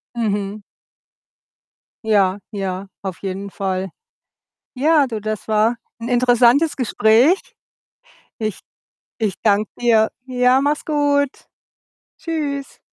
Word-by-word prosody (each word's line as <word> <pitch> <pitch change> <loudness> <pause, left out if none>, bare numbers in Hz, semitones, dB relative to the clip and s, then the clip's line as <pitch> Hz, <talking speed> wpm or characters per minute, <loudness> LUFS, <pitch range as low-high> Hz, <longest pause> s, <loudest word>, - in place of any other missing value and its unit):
Mhm. 205 -2 -2 1.4
Ja, 200 -3 +2
ja, 195 -1 -4 0.2
auf 190 -3 -5
jeden 195 0 -5
Fall. 190 -1 -2 0.9
Ja, 295 +2 +3
du, 220 -3 -4
das 215 0 -4
war 220 +2 +2 0.2
'n 230 - -5
interessantes 245 +4 +4
Gespräch. 245 - +3 1.0
Ich 215 -3 -3 0.6
ich 210 -4 -1
danke 210 -1 +2
dir. 225 -2 +4 0.2
Ja, 250 +1 +3
mach's 290 +1 0
gut. 290 -2 +2 0.9
Tschüss 290 -4 -4
225 Hz, 95 wpm, -20 LUFS, 205-270 Hz, 1.4 s, interessantes